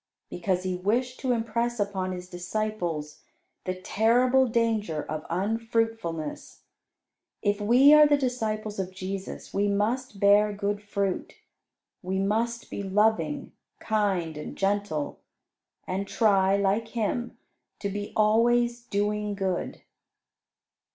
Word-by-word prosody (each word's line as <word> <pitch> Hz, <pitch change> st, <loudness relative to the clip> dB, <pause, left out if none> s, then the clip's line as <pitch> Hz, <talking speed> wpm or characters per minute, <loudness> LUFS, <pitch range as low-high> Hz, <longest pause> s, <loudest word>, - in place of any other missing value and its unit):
Because 180 Hz, +1 st, -1 dB
He 185 Hz, -1 st, -1 dB
wished 240 Hz, +7 st, -1 dB
to 260 Hz, -, 0 dB
impress 235 Hz, 0 st, -1 dB
upon 195 Hz, -2 st, -1 dB
His 180 Hz, 0 st, -6 dB
disciples 175 Hz, -4 st, -3 dB, 0.4 s
the 185 Hz, -, -2 dB
terrible 245 Hz, +7 st, +3 dB
danger 220 Hz, -9 st, 0 dB
of 155 Hz, 0 st, -5 dB
unfruitfulness. 225 Hz, -4 st, -2 dB, 0.8 s
If 205 Hz, 0 st, +1 dB
we 250 Hz, +7 st, +6 dB
are 300 Hz, 0 st, +8 dB
the 290 Hz, 0 st, +4 dB
disciples 220 Hz, -5 st, -2 dB
of 185 Hz, -1 st, -2 dB
Jesus, 190 Hz, +1 st, -6 dB
we 200 Hz, +1 st, +1 dB
must 210 Hz, +3 st, -1 dB
bear 205 Hz, +1 st, +5 dB
good 205 Hz, 0 st, -2 dB
fruit; 200 Hz, -2 st, -2 dB, 0.7 s
we 190 Hz, +1 st, -2 dB
must 225 Hz, +4 st, -1 dB
be -, -, -4 dB
loving, 215 Hz, +8 st, +1 dB, 0.3 s
kind, 195 Hz, -7 st, 0 dB
and 150 Hz, -, -7 dB
gentle, 195 Hz, -6 st, -1 dB, 0.7 s
and 195 Hz, +2 st, -3 dB
try, 195 Hz, -3 st, +3 dB
like 200 Hz, +3 st, +1 dB
Him, 235 Hz, +1 st, -2 dB, 0.4 s
to 200 Hz, -, -3 dB
be 205 Hz, +1 st, -4 dB
always 235 Hz, +3 st, +3 dB
doing 210 Hz, -2 st, -1 dB
good. 190 Hz, -2 st, -3 dB
205 Hz, 115 wpm, -27 LUFS, 190-230 Hz, 0.8 s, are